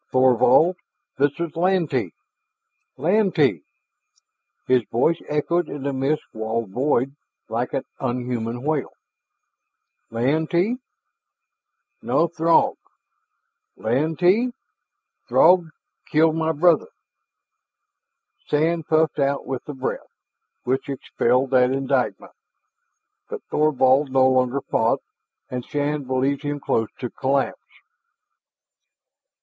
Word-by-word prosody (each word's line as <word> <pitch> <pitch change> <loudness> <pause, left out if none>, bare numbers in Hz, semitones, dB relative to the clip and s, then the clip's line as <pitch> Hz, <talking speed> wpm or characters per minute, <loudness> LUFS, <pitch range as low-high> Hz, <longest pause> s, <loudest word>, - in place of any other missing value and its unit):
"Thorvald! 130 +7 +4 0.4
This 145 +2 +1
is 170 -2 -4
Lantee 165 - +1 0.9
Lantee 160 - +2 0.5
" - - -44
His 130 -1 +4
name 135 +8 +2
echoed 160 +3 0
in 145 -2 -6
the 140 0 -2
mist 135 +3 -1
walled 110 -1 -3
void 135 +3 0 0.3
like - - -2
an - - -1 0.2
unhuman 120 -1 -3
wail. 150 -2 -1 1.2
"Lantee? 160 - 0 1.2
No, 170 - +1
Throg! 165 0 +2 1.0
Lantee 175 - +1 0.8
Throg 175 -2 +5 0.4
killed 160 +1 +3
my 160 0 0
brother!" 160 +1 +3 1.6
Sand 160 +2 0
puffed 155 -1 +2
out 140 0 0
with 130 -1 -4
the 145 - -7
breath, 130 0 -5 0.5
which 130 +3 -2
expelled 130 -1 0
that 125 -1 +4
indictment. 135 -1 -1 1.0
But - - -6
Thorvald 140 -2 +3
no 130 -1 +4
longer 130 +1 +1
fought, - - 0 0.5
and 125 -1 -3
Shann 145 0 -2
believed 130 +2 0
him 145 -1 -3
close 115 -5 -1
to 125 - -5
collapse. 135 +1 -1
140 Hz, 100 wpm, -22 LUFS, 130-160 Hz, 1.6 s, Throg